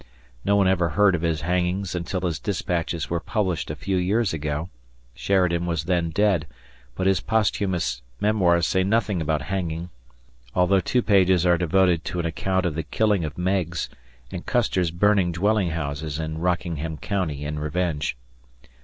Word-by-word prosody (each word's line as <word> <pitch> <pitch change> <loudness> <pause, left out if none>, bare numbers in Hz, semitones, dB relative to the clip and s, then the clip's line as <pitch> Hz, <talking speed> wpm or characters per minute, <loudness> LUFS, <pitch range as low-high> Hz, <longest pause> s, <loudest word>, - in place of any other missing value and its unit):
No 100 - +2
one 100 -2 +4
ever 90 -3 +2
heard 95 +5 +4
of 85 - -1
his 80 -2 0
hangings 90 +2 -1
until 90 +1 -3
his 85 -4 -1
dispatches 85 -5 -2
were 85 - +1
published 95 -5 -2
a 75 - -3
few 95 +5 -2
years 100 +3 +1
ago; 75 +2 -3 0.4
Sheridan 85 +1 +1
was 85 -3 -1
then 85 -1 0
dead, 95 -1 +1 0.5
but 95 - -2
his 95 -2 +3
posthumous 95 - 0 0.2
memoirs 90 -5 +3
say 95 +5 +2
nothing 100 -2 +1
about 80 0 0
hanging, 85 -2 -3 0.6
although 90 +2 +4
two 125 +5 0
pages 95 -3 +4
are 90 -1 +5
devoted 90 -1 +2
to 90 -2 -3
an 85 - -1
account 95 +3 -1
of 85 - 0
the 80 - -2
killing 105 +4 +1
of 75 -3 -5
Meigs 90 -2 -1 0.4
and 90 -2 -5
Custer's 105 -8 +1
burning 95 +1 +2
dwelling 100 +2 +1
houses 75 -1 -3
in 80 0 -4
Rockingham 85 -3 -2
County 80 -8 -2
in 75 0 -3
revenge. 75 -2 -1
90 Hz, 160 wpm, -24 LUFS, 80-95 Hz, 0.6 s, are